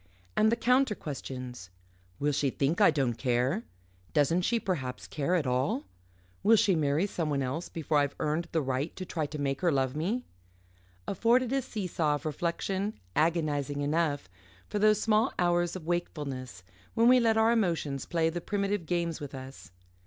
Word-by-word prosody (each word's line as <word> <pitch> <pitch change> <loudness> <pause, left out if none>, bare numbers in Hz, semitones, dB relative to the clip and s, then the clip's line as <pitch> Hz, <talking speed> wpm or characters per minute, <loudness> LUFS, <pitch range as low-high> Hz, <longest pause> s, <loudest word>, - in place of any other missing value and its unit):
and 220 +1 +4
the - - +3
counter 250 0 +3
questions 125 - -7 0.5
Will 145 +1 +1
she 145 -1 +1
think 145 +8 0
I 205 - +8
don't 135 -6 +1
care? 130 - +1 0.5
Doesn't 150 +5 +3
she 230 +6 +1
perhaps 135 - -3
care 155 +5 -1
at 165 -5 +1
all? 130 +3 0 0.6
Will 225 +3 +6
she 215 -3 +4
marry 150 +3 +2
someone 150 -8 -1
else 145 +7 -3
before 155 -2 0
I've 140 -1 0
earned 155 +3 -1
the 160 -2 +1
right 135 +4 -2
to 185 - -5
try 160 -4 -2
to 150 - -6
make 140 -1 -2
her 175 -2 +3
love 135 -1 0
me? 205 +11 -1 0.8
afforded 235 +5 +2
a 270 - +2
see 220 -6 -5
saw 155 -4 +1
of 145 - -7
reflection, 185 +6 -2 0.2
agonising 150 -3 +1
enough, 145 0 0 0.4
for 210 - -2
those 215 0 +4
small 220 +3 +2
hours 175 0 +1
of 180 -4 -7
wakefulness 140 - -3 0.3
when 230 +1 +4
we 255 +1 +7
let 225 -2 +3
our 220 +1 +5
emotions 165 - 0
play 165 -1 +1
the 175 +1 -4
primitive 200 -2 -1
games 170 -2 -1
with 145 -1 -6
us. 130 -4 -10
165 Hz, 175 wpm, -29 LUFS, 140-200 Hz, 0.8 s, I